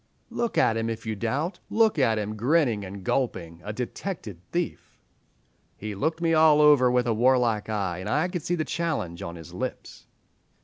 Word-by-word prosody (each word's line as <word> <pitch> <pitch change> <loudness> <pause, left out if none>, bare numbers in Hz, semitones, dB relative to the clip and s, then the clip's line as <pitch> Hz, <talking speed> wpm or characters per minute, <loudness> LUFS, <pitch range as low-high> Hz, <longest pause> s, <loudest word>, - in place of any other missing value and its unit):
"Look 235 -1 -2
at 115 - +3
him, 115 0 -1
if 115 0 -5
you 110 -1 -2
doubt; 135 - -2
look 220 -7 +3
at 115 -5 +3
him, 105 0 -3
grinning 120 -2 +2
and 95 0 -8
gulping, 90 -8 -2
a 105 - -4
detected 120 - -5
thief. 175 -1 -4 0.8
"He 105 0 -5
looked 160 - -1
me 165 -1 +2
all 155 -1 +6
over 145 -4 +6
with 125 -1 +2
a 115 - +1
warlike 120 -2 +2
eye, 95 -5 -2
and 95 +3 -5
I 150 +8 +2
could 180 -2 -4
see 175 - -1
the 155 -2 -2
challenge 150 - -2
on 85 0 -6
his 80 -2 -11
lips." - - -6
120 Hz, 185 wpm, -26 LUFS, 105-155 Hz, 0.8 s, all